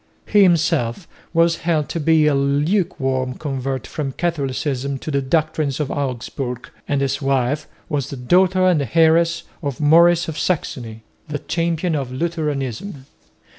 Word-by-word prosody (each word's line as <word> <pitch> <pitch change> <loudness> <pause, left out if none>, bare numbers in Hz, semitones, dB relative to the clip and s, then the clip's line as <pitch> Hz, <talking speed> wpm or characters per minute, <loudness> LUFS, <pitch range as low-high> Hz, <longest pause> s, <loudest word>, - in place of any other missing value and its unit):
He 210 - +4
himself 165 -5 +2 0.2
was 165 0 +3
held 160 -3 0
to 170 - -3
be 160 0 +3
a 150 - +3
lukewarm 140 -3 0
convert 135 -3 -3
from 140 -3 -4
Catholicism 140 -4 -2
to 155 - -6
the 140 -1 +1
doctrines 155 0 0
of 150 -3 -2
Augsburg; 125 -2 -4 0.2
and 140 -1 0
his 135 +1 -1
wife 135 +2 0 0.2
was 145 -3 -2
the 140 - -6
daughter 185 +8 +3
and 155 -9 +2
heiress 165 +1 +4 0.2
of 140 -5 -4
Maurice 170 +3 +5
of 160 -1 -4
Saxony, 120 -10 -3 0.2
the 150 -1 -3
champion 165 +2 -1
of 135 -4 -2
Lutheranism. 145 - -3
150 Hz, 140 wpm, -20 LUFS, 135-165 Hz, 0.2 s, Maurice